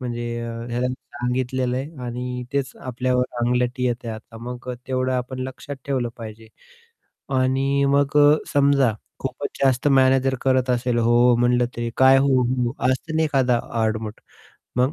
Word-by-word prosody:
म्हणजे 120 -1 -4
अ, 115 0 -5 0.2
ह्याला 125 +1 0 0.3
सांगितलेलं 125 0 -1
आहे 135 0 -6
आणि 125 +1 -4
तेच 140 -2 -1
आपल्यावर 125 0 0 0.2
अंगलटी 125 +1 0
येतेय 120 -1 -2
आता, 110 +1 -11
मग 125 +1 -6 0.2
तेवढं 130 0 0
आपण 125 +1 -3
लक्षात 140 +2 -8
ठेवलं 130 -4 0
पाहिजे. 110 0 -9 0.9
आणि 135 +2 +1
मग 140 +1 +2
अ, 145 0 +7 0.2
समजा 140 -4 +4 0.3
खूपच 135 +2 -4
जास्त 135 +1 +3
मॅनेजर 135 -1 +4
करत 130 -1 +2
असेल 125 -1 +1
"हो, 115 0 +2 0.2
हो" 120 - +5
म्हणलं 120 0 +2
तरी. 120 0 -2
"काय" 130 0 +6
"हो, 135 -1 +3
हो?" 125 0 -1 0.2
असत 130 +5 -3
ना 160 - +3
एखादा 130 -5 +2 0.2
आडमट. 110 0 -2 0.6
मग 130 +4 +2
125 Hz, 155 wpm, -22 LUFS, 120-135 Hz, 0.9 s, अ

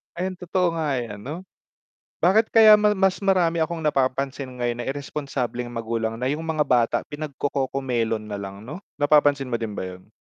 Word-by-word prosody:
Ayun 185 +1 -4
totoo 180 0 0
nga 150 -4 0
yan 115 -5 -5
'no. 165 +6 -6 0.8
Bakit 210 +6 +5
kaya 215 -2 +7
ma 210 0 +3
mas 190 -1 +2
marami 180 -4 +2
akong 160 0 -2
napapansin 135 -1 0
ngayon 120 -1 -2
na - - -6
iresponsableng 135 -3 -3
magulang, 115 -1 -3
na 125 +3 -1
yung 150 +2 -2
mga 155 -2 +1
bata 120 -4 +2
pinagco-Cocomelon 135 -6 -2
nalang 100 -1 -7
'no, 150 +10 -7 0.2
napapansin 145 -2 +3
mo 115 - 0
din 110 -3 -4
ba - - -4
yun? 90 +1 -9
140 Hz, 165 wpm, -24 LUFS, 120-165 Hz, 0.8 s, kaya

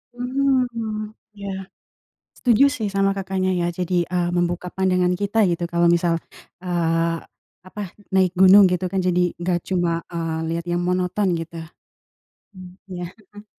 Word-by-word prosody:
Mmm, 245 -4 -1 0.2
ya, 200 -1 -5 0.8
setuju 245 +2 +4
sih, 220 -7 -2
sama 195 0 +2
Kakaknya, 190 -1 -1
ya. 170 - 0
Jadi, 180 0 0
eee, 175 -1 0
membuka 175 +1 -1
pandangan 180 -1 +2
kita, 205 +3 +1
gitu, 170 0 -1
kalau 170 0 +2
misal, 170 -1 +2 0.5
eee, 165 -2 0 0.4
apa, 185 +3 -7 0.3
naik 190 -2 +2
gunung, 190 +2 +8
gitu 180 +1 0
kan. 195 - -3
Jadi 180 -1 +1
nggak 175 0 0
cuma, 175 -3 0
eee, 165 -2 -3
lihat 165 +1 -3
yang 175 0 0
monoton, 180 +1 0
gitu. 165 0 -6 0.9
Mmm, 185 -1 -11 0.2
iya, 180 -1 -4 0.3
heeh. 205 0 -12
180 Hz, 140 wpm, -22 LUFS, 175-200 Hz, 0.9 s, gunung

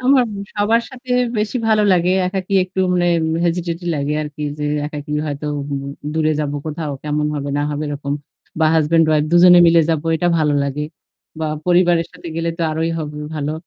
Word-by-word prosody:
আমার 260 0 +4 0.3
সবার 220 +3 +2
সাথে 255 0 -12 0.3
বেশি 215 +4 -1
ভালো 215 -1 +4
লাগে। 180 0 +2 0.2
একাকী 190 +1 -4
একটু 185 +1 -4
মানে 175 -1 +2 0.4
হেজিটেজি 170 0 -2
লাগে 145 0 -1
আরকি 150 0 -7 0.2
যে 150 - -3 0.2
একাকী 150 0 -6
হয়তো 145 0 -4 0.7
দূরে 155 -1 +1
যাব 145 -1 -2
কোথাও 155 -1 -4
কেমন 150 0 -1
হবে 140 -1 -3
না 145 - 0
হবে 150 +1 -3
এরকম, 140 -1 -4 0.5
বা 160 - +5
হাসব্যান্ড 160 +1 +3
উইফ 150 -1 +3
২ - - +6
জনে 180 -1 +8
মিলে 165 0 +6
যাব 160 - +1 0.2
এটা 175 +2 +1
ভালো 150 -2 +2
লাগে। 140 +1 -2 0.6
বা 160 - -1 0.2
পরিবারের 175 -1 +3
সাথে 175 0 -10
গেলে 165 0 -1
তো 170 - -1
আরোই 160 +1 -1
হবে 150 -1 -5 0.2
ভালো। 150 0 -2
160 Hz, 180 wpm, -19 LUFS, 150-180 Hz, 0.7 s, জনে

